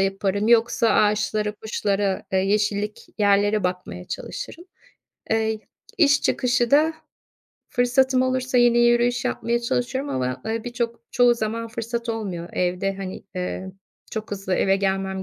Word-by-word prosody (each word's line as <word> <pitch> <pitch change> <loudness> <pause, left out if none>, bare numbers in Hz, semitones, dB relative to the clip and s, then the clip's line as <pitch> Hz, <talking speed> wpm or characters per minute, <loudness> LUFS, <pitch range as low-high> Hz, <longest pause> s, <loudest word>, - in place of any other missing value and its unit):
yaparım, 195 +2 0
yoksa 235 0 +4
ağaçlara, 210 0 +2
kuşlara, 205 -2 -1
eee, 190 - +3
yeşillik 205 +2 0
yerlere 205 0 +3
bakmaya 180 0 -3
çalışırım. 345 - -7 0.7
Eee, 220 -1 +1 0.4
iş 290 -3 +4
çıkışı 245 -2 +1
da 310 +3 +4 0.7
fırsatım 255 +1 +2
olursa 255 -1 +1
yine 240 0 +5
yürüyüş 240 +1 +3
yapmaya 235 +1 0
çalışıyorum 255 +4 -2
ama, 130 0 -2
eee, 225 +1 -2
birçok 240 -1 -3
çoğu 245 -1 +4
zaman 230 0 -3
fırsat 235 +1 -4
olmuyor. 190 -7 -3
Evde, 180 +2 0
hani, 190 0 -6
eee, 185 +1 -4 0.4
çok 220 -1 -5
hızlı 195 -2 -2
eve 195 0 +3
gelmem 190 -1 -1
220 Hz, 130 wpm, -23 LUFS, 195-240 Hz, 0.7 s, yine